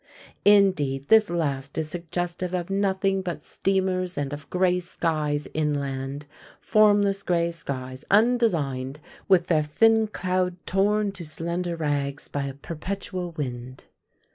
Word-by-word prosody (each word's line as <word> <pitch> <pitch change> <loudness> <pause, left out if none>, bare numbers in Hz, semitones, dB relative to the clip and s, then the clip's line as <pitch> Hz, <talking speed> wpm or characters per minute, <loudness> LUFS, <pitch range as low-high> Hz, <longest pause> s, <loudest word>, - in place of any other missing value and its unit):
Indeed, 185 -10 +4
this 220 -1 +6
last 140 -5 -2
is 160 -1 -1
suggestive 175 +2 -3
of 175 +1 -3
nothing 195 -1 +1
but 180 -2 -5
steamers 185 -2 0
and 145 0 -2
of 145 -1 -8
grey 180 0 +2
skies 155 -4 -2
inland 140 -2 -2 0.3
formless 205 -2 +3
grey 170 -3 +1
skies, 130 -5 -6
undesigned, 170 - +2 0.3
with 185 -3 +4
their 160 -4 +2
thin 220 +9 +3
cloud 185 -3 -1
torn 205 +2 +1
to 185 -3 -8
slender 170 +2 -3
rags 145 -3 -2
by 145 -1 -3
a 135 -1 -5
perpetual 180 +3 -5
wind. 130 -3 -6
170 Hz, 125 wpm, -25 LUFS, 145-195 Hz, 0.3 s, this